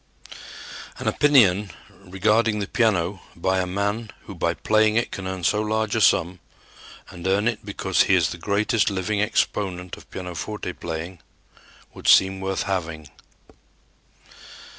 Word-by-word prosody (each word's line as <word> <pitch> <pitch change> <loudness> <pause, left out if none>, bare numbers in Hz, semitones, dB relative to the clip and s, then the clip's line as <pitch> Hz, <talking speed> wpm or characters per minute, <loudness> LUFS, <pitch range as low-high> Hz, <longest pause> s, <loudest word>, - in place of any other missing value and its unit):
An - - -6
opinion 105 -9 +4 0.3
regarding 105 +4 +1
the 100 - -2
piano 100 -6 0
by 95 +2 0
a 90 - -1
man 100 +4 -2
who - - -9
by - - -1
playing 110 0 +2
it 115 - 0
can 95 -1 -5
earn 95 -1 -5
so 105 +5 +2
large 110 0 -1
a 110 - +1
sum, 90 -2 +3 0.7
and 90 +1 -6
earn 100 +3 +2
it 115 -3 -2
because - - 0
he - - +4
is - - +2
the 85 - -7
greatest 105 +4 +1
living 100 +2 -1
exponent 95 -4 -1
of - - -16
pianoforte 90 +2 -6
playing, 85 +2 -6 0.7
would - - -8
seem 95 0 +5
worth 95 0 -2
having. 80 -6 -4
95 Hz, 140 wpm, -23 LUFS, 90-110 Hz, 0.7 s, seem